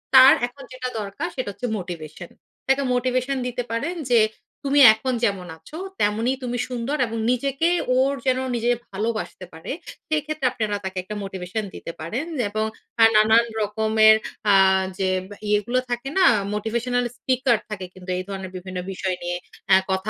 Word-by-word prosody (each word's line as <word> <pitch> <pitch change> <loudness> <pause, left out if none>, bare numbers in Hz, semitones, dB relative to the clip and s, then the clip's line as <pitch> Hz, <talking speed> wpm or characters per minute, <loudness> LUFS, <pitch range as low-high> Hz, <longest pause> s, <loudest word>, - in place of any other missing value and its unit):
তার 260 +1 +10
এখন 270 +3 -14
যেটা 255 0 -4
দরকার 210 +11 -4
সেটা 255 -6 -3
হচ্ছে 200 +5 -5
মোটিভেশন, 175 -2 -7 0.4
তাকে 270 +1 +3
মোটিভেশন 255 +2 0
দিতে 245 0 -3
পারেন। 285 +10 -2 0.2
যে 235 - +6 0.5
তুমি 280 +1 +3
এখন 255 +4 -2
যেমন 195 -4 -1
আছো 305 - -11 0.2
তেমনই 225 +5 +1
তুমি 245 -1 -2
সুন্দর 250 +4 -2
এবং 230 0 -5
নিজেকে 275 +6 +1 0.3
ওর 265 +2 +3
যেন 260 -1 +2 0.2
নিজে 240 +1 +1 0.2
ভালোবাসতে 215 -1 -3
পারে। 160 0 -7 0.4
সেক্ষেত্রে 310 -2 -1
আপনারা 215 -4 -2
তাকে 190 0 -5
একটা 210 +3 -7
মোটিভেশন 195 +2 -4
দিতে - - -6
পারেন 220 - -3 0.2
এবং 215 +1 -1 0.4
আ - - +9
নানান 220 +2 +6 0.2
রকমের 220 +1 +5 0.4
আ - - +6 0.4
যে 190 -1 0 0.4
ইয়েগুলো 210 +5 +2
থাকে 245 +2 -3
না? 375 - +6 0.3
মোটিভেশনাল 235 +3 -1
স্পিকার 255 -1 +2
থাকে 195 -3 -5
কিন্তু 185 0 -12
এই 185 - -3
ধরনের 190 -2 -6
বিভিন্ন 185 0 -6
বিষয় 190 -1 -2
নিয়ে 175 0 -2 0.4
আ - - +10 0.2
কথা 190 +2 -1
225 Hz, 160 wpm, -23 LUFS, 195-255 Hz, 0.5 s, তার